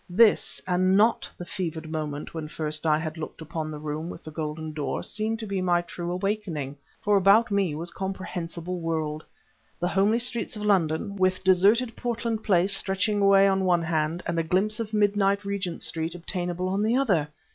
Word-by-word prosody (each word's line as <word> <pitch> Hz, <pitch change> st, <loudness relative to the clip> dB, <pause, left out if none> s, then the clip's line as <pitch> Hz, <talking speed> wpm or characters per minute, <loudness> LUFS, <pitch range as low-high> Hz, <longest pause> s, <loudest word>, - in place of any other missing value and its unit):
This, 215 Hz, +4 st, +4 dB
and 185 Hz, +1 st, +3 dB
not 220 Hz, +3 st, +3 dB
the 175 Hz, -, -7 dB
fevered 165 Hz, -4 st, -4 dB
moment 150 Hz, -2 st, -4 dB
when 160 Hz, -2 st, -5 dB
first 155 Hz, 0 st, -3 dB
I 150 Hz, -1 st, +4 dB
had 160 Hz, 0 st, -5 dB
looked 155 Hz, -, -7 dB
upon 160 Hz, 0 st, -4 dB
the 155 Hz, -, -6 dB
room 155 Hz, +2 st, -4 dB
with 165 Hz, -, -9 dB
the 155 Hz, -, -8 dB
golden 155 Hz, 0 st, -4 dB
door, 145 Hz, -3 st, -3 dB
seemed 220 Hz, +1 st, -2 dB
to -, -, -4 dB
be 195 Hz, -2 st, -2 dB
my 175 Hz, -1 st, +2 dB
true 175 Hz, 0 st, -5 dB
awakening, 180 Hz, -7 st, -2 dB, 0.3 s
for 205 Hz, -1 st, +4 dB
about 200 Hz, +4 st, +5 dB
me 195 Hz, -6 st, +1 dB
was 170 Hz, +3 st, -1 dB
comprehensible 180 Hz, -2 st, -4 dB
world, 160 Hz, -2 st, -2 dB, 0.6 s
the 175 Hz, -, 0 dB
homely 200 Hz, +4 st, +3 dB
streets 240 Hz, -2 st, -2 dB
of 210 Hz, -, -5 dB
London, 195 Hz, 0 st, +1 dB
with 185 Hz, -1 st, +1 dB
deserted 205 Hz, +6 st, +4 dB
Portland 235 Hz, -2 st, -2 dB
Place 190 Hz, 0 st, +3 dB
stretching 200 Hz, +2 st, 0 dB
away 195 Hz, 0 st, +6 dB
on 195 Hz, 0 st, +2 dB
the 190 Hz, -, 0 dB
one 175 Hz, -2 st, +3 dB
hand 160 Hz, +1 st, -1 dB
and 170 Hz, -1 st, -1 dB
a -, -, +1 dB
glimpse 195 Hz, +6 st, +1 dB
of 220 Hz, -2 st, -3 dB
midnight 205 Hz, -1 st, +2 dB
Regent 195 Hz, -4 st, -3 dB
Street 165 Hz, +1 st, -2 dB
obtainable 175 Hz, +1 st, -3 dB
on 195 Hz, +2 st, 0 dB
the 220 Hz, +3 st, +2 dB
other! 195 Hz, -, +2 dB
185 Hz, 190 wpm, -26 LUFS, 160-200 Hz, 0.6 s, away